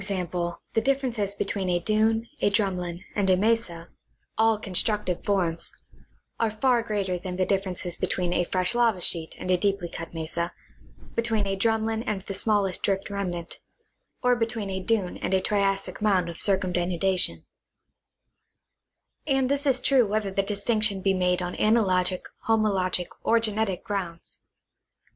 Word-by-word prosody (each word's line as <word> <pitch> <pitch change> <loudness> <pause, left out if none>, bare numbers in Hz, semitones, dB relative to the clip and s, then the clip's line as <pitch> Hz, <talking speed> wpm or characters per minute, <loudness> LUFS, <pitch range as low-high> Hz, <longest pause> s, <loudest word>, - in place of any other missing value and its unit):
g. 195 -2 -2 0.5
the 225 - +2
differences 240 -6 0
between 195 -2 -2
a 175 - +2
dune, 220 +5 +1
a - - +4
drumlin 180 -4 -1
and 200 -2 +1
a 185 - +5
mesa 200 -5 0 0.5
(all 225 0 +3
constructive 205 -2 -1
forms) 175 -5 +1 0.7
are 230 - +2
far 240 +3 +2
greater 200 -5 -2
than 180 0 -5
the 185 - +2
differences 185 -3 -1
between 180 -1 -1
a 175 - +2
fresh 185 +3 +1
lava 235 -5 +2
sheet 165 -2 -2
and 185 - -3
a 180 - +3
deeply 195 -2 0
cut 165 0 -7
mesa, 170 +1 -3 0.6
between 225 -3 +1
a 195 0 -1
drumlin 220 +2 0
and 195 -3 -2
the 195 - -5
smallest 200 -2 +1
drift 195 0 -1
remnant, 175 -4 -4 0.6
or 250 0 +4
between 225 -4 -2
a 190 - -2
dune 190 -1 0
and 190 - 0
a - - +4
Triassic 195 -1 0
mound 190 -5 +2
of 170 - -7
circumdenudation; 185 -1 +1 1.8
and 270 -2 +2
this 285 +1 +1
is 260 -2 +3
true 255 -2 +3
whether 210 -1 -1
the 195 - +1
distinc 205 +2 0
tion 200 -3 +1
be 195 - +3
made 180 -1 +1
on 180 0 -4
analogic, 185 -5 +2 0.2
homologic, 195 -5 +2 0.2
or 230 - +4
genetic 215 -4 -1
grounds. 180 -5 -5
195 Hz, 155 wpm, -26 LUFS, 180-220 Hz, 1.8 s, a